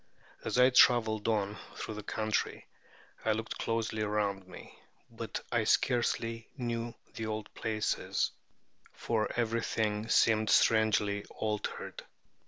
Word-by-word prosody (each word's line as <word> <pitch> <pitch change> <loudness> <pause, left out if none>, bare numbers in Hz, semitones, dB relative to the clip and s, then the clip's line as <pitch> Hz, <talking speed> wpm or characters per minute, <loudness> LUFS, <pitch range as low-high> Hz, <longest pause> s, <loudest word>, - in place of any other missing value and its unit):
As - - -1
I 125 +1 +6
traveled 110 -4 +5
on 105 -2 0 0.2
through - - -5
the 105 - -6
country, 110 +1 -2 0.6
I 110 - +3
looked 110 +1 -4
closely 115 -1 -1
around 105 -2 -1
me; - - -12 0.4
but - - -5
I - - +2
scarcely 115 -2 +1
knew 120 -2 -3 0.2
the 110 - -4
old 110 -1 -4
places, 110 -1 -1 0.6
for 110 -2 -1
everything 110 -2 0
seemed 110 -2 +4
strangely 105 -2 +3
altered. 105 -1 -4
110 Hz, 115 wpm, -31 LUFS, 105-115 Hz, 0.6 s, I